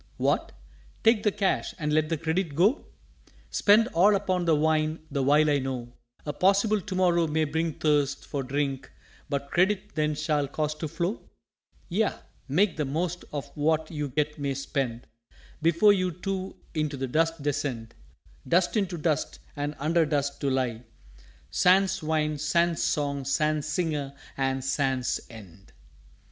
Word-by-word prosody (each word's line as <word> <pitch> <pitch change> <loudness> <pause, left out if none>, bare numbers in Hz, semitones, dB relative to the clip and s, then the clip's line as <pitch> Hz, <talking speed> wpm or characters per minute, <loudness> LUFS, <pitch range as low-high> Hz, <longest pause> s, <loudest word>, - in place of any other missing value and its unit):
_" - - -29
"What! - - 0 0.5
take 225 -1 +5
the 210 - +2
Cash 195 -1 -1
and 150 -3 -1
let 155 0 +2
the 165 - 0
Credit 160 0 -1
go? 200 - +2 0.6
Spend 220 +2 +5
all 200 +3 +4
upon 185 -2 0
the 165 -2 +4
Wine 155 +1 +1
the 140 - 0
while 145 +3 +4
I 145 -1 +3
know 125 -2 -4 0.3
A 145 - -3
possible 200 +5 +3
To 190 0 -5
morrow 175 -2 +3
may 155 +1 +1
bring 160 +2 -1
thirst 145 -3 +1
For 140 - -3
Drink 135 0 -2 0.4
but 140 -1 -3
Credit 195 +3 +1
then 155 -1 0
shall 150 -1 0
cause 150 +2 -2
to 155 +1 -5
flow?" 170 +7 -3 0.6
"_Yea, 210 +4 0 0.3
make 175 +6 +2
the 150 - 0
most 170 +5 -2
of 145 -2 -5
what 155 +1 0
you 150 -3 -3
yet 150 0 0
may 140 -1 -1
spend, 130 -3 -3 0.6
Before 170 +6 +4
we 185 -3 +3
too 190 0 -3 0.2
into 155 -3 -1
the 135 0 -2
Dust 165 +3 0
descend; 135 -6 -2 0.5
Dust 175 +4 +2
into 190 -5 0
Dust, 155 -1 -1 0.2
and 145 +1 -3
under 160 +2 +2
Dust, 140 -2 -1
to 140 - +1
lie, 125 -4 -1 0.7
Sans 190 +1 +3
Wine, 155 -1 0
sans 170 +2 +1
Song, 140 -2 0
sans 150 +2 +1
Singer, 150 -4 -2 0.2
and 135 -1 -1
sans 135 -2 0
End! 100 -5 -14
155 Hz, 155 wpm, -27 LUFS, 140-175 Hz, 0.7 s, take